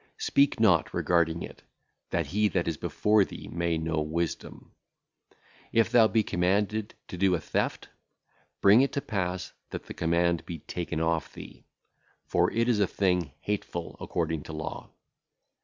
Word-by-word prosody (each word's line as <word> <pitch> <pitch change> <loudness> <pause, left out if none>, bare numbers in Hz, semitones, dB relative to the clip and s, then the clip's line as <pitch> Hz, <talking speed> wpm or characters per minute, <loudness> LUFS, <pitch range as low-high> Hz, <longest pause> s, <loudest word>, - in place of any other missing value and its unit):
Speak 140 -3 +2
not 95 -8 +4
regarding 85 -1 +1
it, - - -10 0.5
that - - 0
he 105 +1 +3
that 90 -4 -1
is 80 - 0
before 105 +7 +2
thee - - -8
may 85 -1 0
know 80 -1 -1
wisdom. 80 +2 -4 1.0
If 115 0 +3
thou 120 -3 +6
be 110 0 +2
commanded 100 +4 0
to 90 - -7
do 95 -1 +4
a - - -2
theft, 75 - -2 0.7
bring 100 +5 +7
it 135 - +1
to 140 - -1
pass 90 -6 -3 0.2
that - - -6
the - - -8
command 85 0 +1
be 85 - -6
taken 80 0 -4
off 80 0 0
thee, - - -12 0.6
for - - +1
it 115 +1 +1
is 120 -4 +2
a 100 - +3
thing 90 -8 0
hateful 100 -4 -4
according 80 -3 -2
to 80 - -8
law. 75 0 -6
90 Hz, 155 wpm, -28 LUFS, 80-105 Hz, 1.0 s, bring